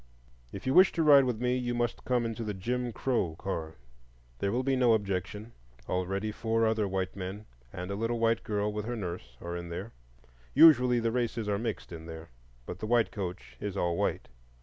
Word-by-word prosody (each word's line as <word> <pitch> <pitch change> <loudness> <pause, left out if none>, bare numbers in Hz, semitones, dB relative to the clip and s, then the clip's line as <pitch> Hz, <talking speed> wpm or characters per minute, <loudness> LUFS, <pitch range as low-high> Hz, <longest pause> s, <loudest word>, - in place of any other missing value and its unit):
If - - -8
you 130 - +1
wish 190 +4 +7
to 165 - +1
ride 140 -3 +7
with 120 -4 -1
me 125 +1 +1
you 120 -1 -1
must 120 -1 -2
come 125 -2 +1
into 115 0 -3
the 105 -2 -3
"Jim 120 +5 -2
Crow 115 -10 -1
Car." 80 -3 -4 0.6
There 100 - 0
will 125 +2 0
be 135 0 +1
no 125 -3 +4
objection,—already 95 - -4
four 115 +1 0
other 110 -2 +1
white 95 -1 -2
men, 100 +2 -6 0.3
and 90 +2 -6
a - - -2
little 115 +3 -1
white 115 0 +2
girl 105 0 -1
with 105 0 -3
her 120 +1 -3
nurse, 85 - -6
are 85 0 -5
in 85 0 -6
there. 95 +6 -5 0.6
Usually 125 -6 +7
the 115 0 0
races 115 -2 -1
are 100 -1 0
mixed 115 -4 -4
in 80 -1 -8
there; 80 0 -9 0.3
but 90 - -7
the 110 - -4
white 120 -1 +3
coach 95 -3 -6
is 100 -1 -4
all 85 -2 +1
white. - - -1
110 Hz, 200 wpm, -30 LUFS, 95-120 Hz, 0.6 s, wish